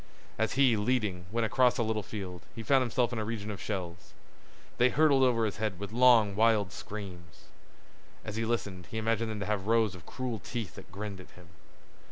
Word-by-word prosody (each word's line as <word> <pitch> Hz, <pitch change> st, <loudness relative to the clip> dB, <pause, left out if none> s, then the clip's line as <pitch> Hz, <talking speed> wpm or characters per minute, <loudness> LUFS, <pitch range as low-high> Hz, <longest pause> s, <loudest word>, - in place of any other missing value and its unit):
As 110 Hz, 0 st, +1 dB
he, 130 Hz, -3 st, +4 dB
leading, 105 Hz, -5 st, 0 dB
went 115 Hz, 0 st, +1 dB
across 120 Hz, +3 st, +3 dB
a 120 Hz, -, +1 dB
little 110 Hz, -1 st, -1 dB
field, 95 Hz, -4 st, -7 dB
he 115 Hz, -, -6 dB
found 135 Hz, +3 st, +4 dB
himself 125 Hz, 0 st, 0 dB
in 115 Hz, -, -2 dB
a -, -, -1 dB
region 105 Hz, -1 st, -4 dB
of 100 Hz, -, -7 dB
shells. 90 Hz, -4 st, -5 dB, 0.7 s
They 125 Hz, +1 st, +6 dB
hurtled 140 Hz, +1 st, +4 dB
over 120 Hz, -3 st, +3 dB
his 100 Hz, -5 st, -3 dB
head 105 Hz, -3 st, -2 dB
with 100 Hz, 0 st, -6 dB
long 115 Hz, -4 st, +5 dB
wild 110 Hz, -3 st, +3 dB
screams. 90 Hz, -8 st, -9 dB, 0.8 s
As 105 Hz, -, -5 dB
he 115 Hz, -, -1 dB
listened 100 Hz, -6 st, -3 dB
he 110 Hz, -, -5 dB
imagined 115 Hz, 0 st, 0 dB
them 105 Hz, -1 st, -4 dB
to -, -, -2 dB
have 105 Hz, -1 st, -2 dB
rows 110 Hz, -3 st, +3 dB
of 90 Hz, -4 st, -12 dB
cruel 125 Hz, -4 st, -4 dB
teeth 115 Hz, -4 st, -5 dB
that -, -, -13 dB
grinned 100 Hz, 0 st, -6 dB
at 90 Hz, -, -12 dB
him. 90 Hz, -1 st, -16 dB
110 Hz, 205 wpm, -30 LUFS, 100-115 Hz, 0.8 s, They